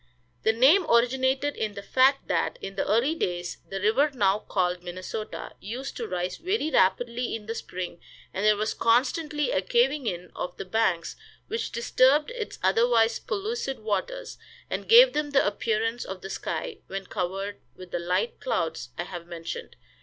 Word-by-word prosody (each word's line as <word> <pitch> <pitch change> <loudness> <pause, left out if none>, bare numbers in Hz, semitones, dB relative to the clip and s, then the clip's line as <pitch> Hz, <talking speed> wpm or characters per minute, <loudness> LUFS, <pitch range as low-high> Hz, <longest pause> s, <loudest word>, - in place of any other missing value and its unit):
The 220 - +4
name 270 - +5
originated 260 +4 +2
in 215 -2 -3
the 200 - -7
fact 265 +5 +3
that, - - 0
in 195 - -6
the - - -1
early 235 +9 +3
days, 175 - -3
the 195 - -3
river 225 +9 +3
now 205 -5 +2
called 180 -3 -1
Minnesota 185 +4 -6
used 250 +7 -6
to 235 - -3
rise 180 -1 -2
very 365 -2 -1
rapidly 240 +3 +2
in 215 -2 -7
the 225 - -3
spring, 180 -5 -6 0.3
and 190 - -2
there 210 0 +5
was 215 +1 -1
constantly 290 +5 +1
a 185 - +2
caving 245 +7 +2
in 180 -3 -4
of 180 - -5
the - - -5
banks, 185 -4 0 0.3
which 450 +1 -2
disturbed 260 - +3
its 470 -4 -5
otherwise 225 +4 +3
pellucid 425 - -3
waters, - - -3 0.3
and - - -3
gave - - +9
them 300 -1 -1
the 280 -1 +3
appearance 225 +3 0
of 190 -1 -7
the 195 - -7
sky 470 -5 -4
when 195 0 -5
covered 195 +2 -3 0.2
with 185 -1 -12
the - - -1
light 180 +6 -1
clouds 165 - -2
I - - -1
have 175 -1 -8
mentioned. 165 -1 -7
225 Hz, 170 wpm, -27 LUFS, 190-275 Hz, 0.3 s, gave